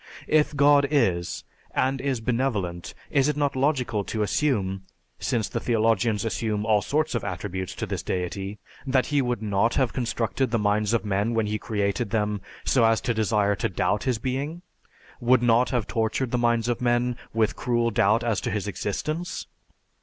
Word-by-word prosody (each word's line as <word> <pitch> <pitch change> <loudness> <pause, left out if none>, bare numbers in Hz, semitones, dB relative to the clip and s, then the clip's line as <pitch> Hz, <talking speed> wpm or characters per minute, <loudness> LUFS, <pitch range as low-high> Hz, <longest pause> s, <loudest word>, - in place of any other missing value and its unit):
If 150 -1 +2
God 145 0 +5
is, 95 - +1 0.3
and 130 +1 +1
is 135 -4 -1
benevolent, 110 -8 -2 0.2
is 140 +1 +3
it 150 - -1
not 145 -2 0
logical 130 -6 +1
to 110 -1 -1
assume 100 -5 0 0.4
(since 115 -3 0
the - - -3
theologians 115 -2 +1
assume 110 -2 -1
all 105 -1 +3
sorts 150 +9 0
of 120 - -1
attributes 95 -1 -4
to - - -3
this - - -3
deity) 95 +3 -3 0.3
that 130 -1 +2
he 145 -1 +1
would 120 -4 -2
not 105 +2 +1
have 130 -4 +1
constructed 120 +1 -1
the 115 - +1
minds 105 +1 +1
of 115 - -1
men 105 +3 0
when 115 -1 +2
He 105 +1 -2
created 100 -2 -1
them 105 -2 -1 0.2
so 125 - +3
as 115 0 +4
to 120 - 0
desire 105 -2 +1
to - - -1
doubt 100 +3 0
His 125 -3 +1
being; 140 +8 -3 0.6
would 120 +1 +3
not 120 +1 +4
have 120 -6 0
tortured 115 +3 -1
the 125 - +1
minds 120 -1 +2
of 120 -1 -1
men 120 0 +1 0.2
with 110 -1 +1
cruel 120 -1 0
doubt 110 +2 +3
as 115 -3 0
to - - -2
His 105 -1 -2
existence? 155 - -3
115 Hz, 180 wpm, -25 LUFS, 105-130 Hz, 0.6 s, God